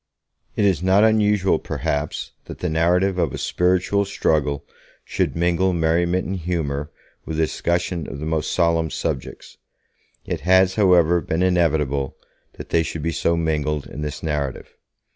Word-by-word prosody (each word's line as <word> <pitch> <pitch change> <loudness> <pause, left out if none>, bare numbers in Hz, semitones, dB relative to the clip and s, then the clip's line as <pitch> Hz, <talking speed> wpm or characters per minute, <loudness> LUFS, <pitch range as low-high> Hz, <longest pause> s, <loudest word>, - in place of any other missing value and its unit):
It 105 - +2
is 95 -6 +2
not 95 +4 +4
usual, 105 -3 +2
perhaps, 75 +1 -3
that - - -9
the 90 - -2
narrative 90 +4 +2
of 80 -6 0
a - - -4
spiritual 90 +3 +1
struggle 75 -7 0 0.4
should - - -1
mingle 90 +2 +1
merriment 85 +2 +1
and 95 +1 -3
humour 80 -5 -3 0.3
with 80 - -5
a - - +4
discussion 85 0 -1
of - - -6
the 75 - -5
most 80 -1 -1
solemn 85 -2 +1
subjects. 65 - -5 0.7
It - - -3
has, 95 +4 +4
however, 90 -4 +4
been 80 +3 -1
inevitable 75 -7 +1 0.4
that - - -10
they 85 - +3
should 80 -1 -4
be 85 - 0
so 85 +1 0
mingled 75 -2 -1
in 75 - -8
this 75 -1 -5
narrative. 75 -5 -3
85 Hz, 155 wpm, -22 LUFS, 75-90 Hz, 0.7 s, not